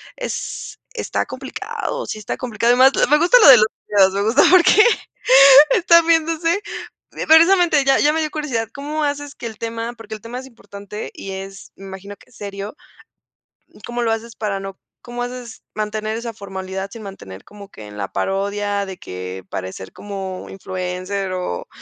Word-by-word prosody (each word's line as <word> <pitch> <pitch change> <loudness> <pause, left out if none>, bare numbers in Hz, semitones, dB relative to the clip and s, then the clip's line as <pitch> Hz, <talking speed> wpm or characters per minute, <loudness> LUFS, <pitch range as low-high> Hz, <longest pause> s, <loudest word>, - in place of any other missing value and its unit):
es - - -6 0.2
está 455 - -2
complicado. - - -5
Sí, - - -5
está 215 - -5
complicado, 235 -1 +1
y - - +1
más 260 +1 +7 0.2
Me 300 - +6
gusta, 350 +9 +5
lo - - +8
de 260 - +11
los 215 -1 +4 0.2
videos. 195 -2 +4
Me 200 - -1
gusta, 225 +6 +3
porque 370 +3 +6 0.9
estar 335 -2 +5
viéndose 330 +2 +1 0.7
Precisamente, 330 -1 +5
ya 270 - +4
ya 295 - +4
me 320 - 0
dio 305 -1 -2
curiosidad. 255 -8 -3
¿Cómo 300 +2 -4
haces 290 0 -3
que - - -9
el 220 -2 -9
tema? 230 +1 -4
Porque 225 -2 -11
el 215 - -12
tema 235 +3 -7
es 260 - -10
importante, 210 -4 -9
y 195 - -8
es 195 +1 -9
me 195 - -13
imagino, 195 +1 -9
que - - -22
es - - -22
serio. 200 +3 -7 1.1
¿Cómo 240 0 -4
lo 225 - +1
haces, 225 +1 -4
para 205 -2 -2
no? 195 -1 -8 0.2
¿Cómo 245 0 -6
haces, 245 -1 -8
mantener 215 +1 -3
esa 230 0 -6
formalidad, 190 -1 -6
sin 230 - -10
mantener 100 - -10
como 205 -1 -13
que 110 - -12
en 105 0 -11
la 100 -2 -5
parodia, 200 +1 -1
de 190 -1 -8
que 90 +1 -8
parecer 95 0 -7
como 195 -2 -7
influencer, 185 +1 -4
o 180 - -4
215 Hz, 180 wpm, -20 LUFS, 195-270 Hz, 1.1 s, de